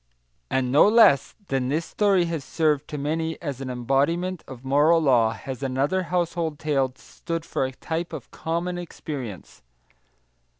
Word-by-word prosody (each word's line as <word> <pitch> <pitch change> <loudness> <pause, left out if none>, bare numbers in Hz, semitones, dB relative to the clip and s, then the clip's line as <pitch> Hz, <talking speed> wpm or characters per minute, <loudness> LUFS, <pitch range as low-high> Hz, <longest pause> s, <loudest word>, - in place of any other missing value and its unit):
And 130 -1 0
no 145 +8 +6
less 210 - +5
truly 205 - -33
than 125 0 -2
this 155 +4 0
story 195 -4 +2
has 165 -4 -3
served 150 -1 0
to 150 - -5
many 160 +3 -2
as 140 -5 -5
an 130 - -4
embodiment 145 +9 0
of 130 0 -10
moral 150 +5 +4
law 125 -7 +4
has 130 +1 -7
another 140 +7 0
household 170 -3 -1
tale 140 -4 0
stood 165 +4 -6
for 135 - -1
a 130 - -3
type 165 +5 -4
of - - -8
common 170 +2 -3
experience. 135 - -7
150 Hz, 160 wpm, -25 LUFS, 135-170 Hz, -, no